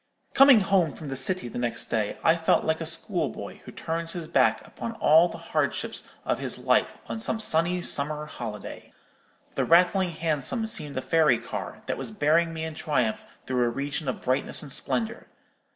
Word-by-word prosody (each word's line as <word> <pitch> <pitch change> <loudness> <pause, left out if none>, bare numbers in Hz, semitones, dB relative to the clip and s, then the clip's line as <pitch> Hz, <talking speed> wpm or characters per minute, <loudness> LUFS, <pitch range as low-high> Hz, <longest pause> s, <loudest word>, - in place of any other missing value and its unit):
"Coming 275 -5 +7
home 190 -5 +2
from 155 -3 -8
the 135 - -3
City 135 +3 +1
the 120 - -6
next 120 -1 -2
day, 110 -2 -1
I 165 - +5
felt 165 -1 +2
like 160 +1 0
a 165 - -2
schoolboy 165 - -2
who - - -9
turns 165 0 -4
his 170 -3 -5
back 170 - +2
upon 230 - -6
all 165 -5 +5
the - - -8 0.2
hardships - - -1 0.2
of - - 0
his - - -2
life, - - +1
on 225 - -4
some 220 0 0
sunny 175 -2 0
summer 150 +1 0
holiday. 110 -8 -8 0.6
The - - 0
rattling 180 +2 +4
Hansom 165 - -1
seemed 150 -10 -3
a - - 0
fairy 160 -2 +3
car, - - -7
that - - -3
was - - -4
bearing 165 -4 +2
me 160 -1 -5
in 160 0 -4
triumph 125 -8 -1 0.2
through 125 -1 0
a 120 - +2
region 140 +3 -3
of - - -4
brightness 130 +4 0
and 145 - -6
splendour. 125 -4 -1
160 Hz, 185 wpm, -26 LUFS, 140-175 Hz, 0.6 s, Coming